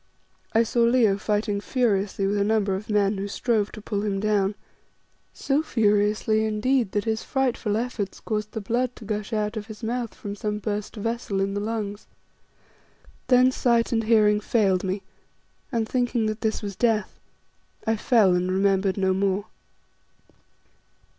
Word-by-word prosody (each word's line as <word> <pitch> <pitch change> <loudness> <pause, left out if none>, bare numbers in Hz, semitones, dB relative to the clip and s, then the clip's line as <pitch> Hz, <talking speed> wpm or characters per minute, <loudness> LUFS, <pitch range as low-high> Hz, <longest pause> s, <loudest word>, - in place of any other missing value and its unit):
I 225 +1 +4
saw 235 +1 -2
Leo 235 -3 +4
fighting 205 -1 -1
furiously 205 -6 0
with 205 +1 +1
a - - +3
number 205 -2 +1
of 195 +3 -5
men 205 -1 +2
who 200 - -3
strove 210 0 0
to 215 - -9
pull 205 -2 -2
him 200 -2 -1
down, 205 -1 +1 0.8
so 280 +2 0
furiously, 215 -4 +2
indeed 220 +1 +1
that 205 - 0
his 220 -1 -1
frightful 245 -5 -1
efforts 230 -4 -3
caused 215 -1 -3
the 220 - -3
blood 245 +4 -1
to 220 - -11
gush 210 +1 -3
out 215 0 -1
of 210 0 -5
his 220 0 -10
mouth 235 0 -3
from 205 0 -6
some 210 0 -3
burst 210 +1 -4
vessel 225 -2 -2
in 195 0 0
the 205 - -1
lungs. 210 -1 -4 1.2
Then 255 0 +5
sight 235 -2 +1
and 225 -2 +1
hearing 210 -2 +4
failed 200 -4 +1
me, 190 +1 -2 0.7
and 230 -3 0
thinking 245 -2 0
that 215 0 -2
this 220 0 -1
was 200 -1 -4
death, 225 -2 0 0.7
I 225 - +2
fell 215 -4 +4
and 180 +1 0
remembered 195 0 +2
no 190 -1 +2
more. 195 +1 0
215 Hz, 160 wpm, -25 LUFS, 200-230 Hz, 1.2 s, Then